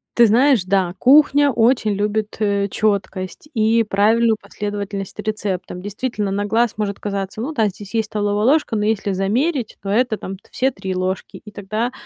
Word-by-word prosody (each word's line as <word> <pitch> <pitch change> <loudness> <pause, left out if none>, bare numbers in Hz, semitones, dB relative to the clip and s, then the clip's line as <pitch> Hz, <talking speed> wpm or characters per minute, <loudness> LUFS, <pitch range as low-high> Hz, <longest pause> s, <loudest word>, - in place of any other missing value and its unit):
ты 235 - +7
знаешь, 240 -1 +4
да, 185 -2 +1
кухня 285 +1 +5
очень 230 -2 +2
любит, 210 +1 -1
э, 200 -2 +1
чёткость 200 +3 -2
и 225 0 +3
правильную 220 +3 +3
последовательность 205 -2 -5
рецептам. 195 -4 -3
Действительно, 210 +1 -3
на 200 +1 -1
глаз 230 +2 +1
может 205 -2 -2
казаться: 200 0 -4
"Ну 270 +8 -3
да, 220 -7 +2
здесь 200 +3 -11
есть 220 -2 0
столовая 205 0 -1
ложка", 285 -3 +2
но 210 - 0
если 210 -2 0
замерить, 235 - -1
то 195 - -9
это 225 +1 +1
там 195 - -6 0.2
все 265 +1 +1
3 195 -4 -5
ложки, 185 +1 -3
и 210 - -10
тогда 215 +5 -3
210 Hz, 170 wpm, -20 LUFS, 200-230 Hz, 0.2 s, ты